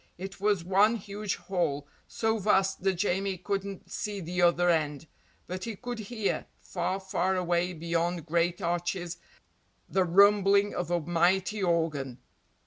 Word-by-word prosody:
It 190 Hz, +2 st, -8 dB
was 205 Hz, -4 st, +2 dB
one 200 Hz, +5 st, +4 dB
huge 210 Hz, -1 st, -4 dB
hall, 150 Hz, -7 st, -2 dB, 0.2 s
so 220 Hz, 0 st, 0 dB
vast 195 Hz, -2 st, +2 dB
that 195 Hz, 0 st, +2 dB
Jamie 190 Hz, +1 st, 0 dB
couldn't 195 Hz, +1 st, -4 dB
see 210 Hz, -2 st, -3 dB
the 180 Hz, 0 st, -2 dB
other 175 Hz, 0 st, +4 dB
end, 155 Hz, -3 st, +1 dB, 0.4 s
but 185 Hz, +1 st, -5 dB
he 225 Hz, -2 st, -4 dB
could 245 Hz, +2 st, -6 dB
hear, 220 Hz, -1 st, -2 dB
far, 185 Hz, +1 st, -3 dB
far 190 Hz, 0 st, 0 dB
away 175 Hz, 0 st, +1 dB
beyond 170 Hz, 0 st, -1 dB
great 170 Hz, +2 st, 0 dB
arches, 175 Hz, 0 st, -2 dB, 0.7 s
the 190 Hz, -, +2 dB
rumbling 200 Hz, +2 st, +5 dB
of 175 Hz, -2 st, -3 dB
a 175 Hz, 0 st, +2 dB
mighty 175 Hz, +5 st, +1 dB
organ. 160 Hz, -8 st, 0 dB
185 Hz, 140 wpm, -29 LUFS, 170-200 Hz, 0.7 s, rumbling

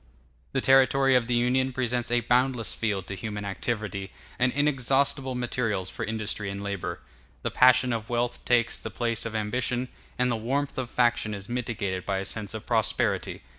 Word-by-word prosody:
]] 65 Hz, +1 st, -36 dB
The 135 Hz, -, +1 dB
territory 135 Hz, 0 st, +5 dB
of 125 Hz, -2 st, +3 dB
the 125 Hz, -, +1 dB
Union 130 Hz, +2 st, +2 dB
presents 125 Hz, -1 st, -1 dB
a 120 Hz, 0 st, +2 dB
boundless 125 Hz, 0 st, +2 dB
field 100 Hz, -4 st, -2 dB
to 100 Hz, -, -5 dB
human 105 Hz, +1 st, -5 dB
activity, 100 Hz, -1 st, -3 dB, 0.3 s
and 125 Hz, +1 st, +3 dB
inexhaustible 135 Hz, -1 st, +1 dB
materials 115 Hz, -6 st, -2 dB
for -, -, -5 dB
industry 110 Hz, -2 st, -2 dB
and 100 Hz, +1 st, -5 dB
labor. 100 Hz, -2 st, -4 dB, 0.4 s
The -, -, -1 dB
passion 125 Hz, 0 st, +5 dB
of 115 Hz, -1 st, -4 dB
wealth 120 Hz, 0 st, -1 dB
takes 120 Hz, -2 st, +2 dB
the -, -, -6 dB
place 115 Hz, -1 st, -1 dB
of 110 Hz, -, -7 dB
ambition, 125 Hz, +3 st, -1 dB, 0.3 s
and 125 Hz, 0 st, +2 dB
the -, -, +1 dB
warmth 135 Hz, +6 st, -2 dB
of 125 Hz, -2 st, -3 dB
faction 120 Hz, -4 st, +1 dB
is 100 Hz, 0 st, -8 dB
mitigated 115 Hz, -6 st, -3 dB
by 95 Hz, 0 st, -1 dB
a 95 Hz, -, -3 dB
sense 110 Hz, 0 st, -2 dB
of 110 Hz, -, -7 dB
prosperity. 115 Hz, -2 st, 0 dB
120 Hz, 180 wpm, -27 LUFS, 105-125 Hz, 0.4 s, territory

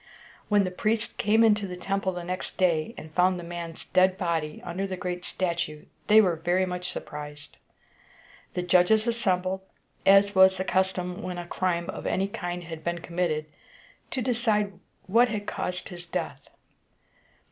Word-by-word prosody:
When 205 Hz, -1 st, +4 dB
the 185 Hz, -, -2 dB
priests 215 Hz, +4 st, -1 dB
came 220 Hz, +2 st, +4 dB
into 210 Hz, -2 st, +4 dB
the 180 Hz, -, -6 dB
temple 195 Hz, +1 st, -1 dB
the 175 Hz, -1 st, -6 dB
next 185 Hz, +1 st, -5 dB
day, 175 Hz, +4 st, +1 dB
and 155 Hz, 0 st, -10 dB
found 180 Hz, +1 st, +3 dB
the -, -, -7 dB
man's 170 Hz, -1 st, -7 dB
dead 185 Hz, 0 st, +3 dB
body 165 Hz, -4 st, -1 dB
under 195 Hz, +3 st, -3 dB
the 185 Hz, -1 st, -4 dB
great 180 Hz, -1 st, -4 dB
statue, 170 Hz, -5 st, -2 dB, 0.2 s
they 215 Hz, +1 st, +8 dB
were 180 Hz, -6 st, +3 dB
very 175 Hz, +3 st, +1 dB
much 180 Hz, 0 st, -4 dB
surprised. 150 Hz, 0 st, -8 dB, 1.0 s
The 180 Hz, -, -1 dB
judges 180 Hz, +5 st, +4 dB
assembled, 190 Hz, -5 st, 0 dB, 0.4 s
as 195 Hz, +1 st, +6 dB
was 190 Hz, 0 st, +6 dB
the 190 Hz, -, -1 dB
custom 185 Hz, -1 st, 0 dB
when 180 Hz, -1 st, -4 dB
a 175 Hz, -, -5 dB
crime 175 Hz, -1 st, -1 dB
of -, -, -6 dB
any 195 Hz, +1 st, +1 dB
kind 175 Hz, -2 st, -4 dB
had 165 Hz, -1 st, -8 dB
been 170 Hz, 0 st, -1 dB
committed, 170 Hz, -3 st, -1 dB, 0.6 s
to 255 Hz, -, -2 dB
decide 220 Hz, -4 st, +1 dB, 0.3 s
what 230 Hz, +6 st, +5 dB
had 210 Hz, -2 st, -3 dB
caused 180 Hz, -2 st, -3 dB
his 175 Hz, -1 st, -8 dB
death. -, -, -4 dB
180 Hz, 165 wpm, -27 LUFS, 175-195 Hz, 1.0 s, they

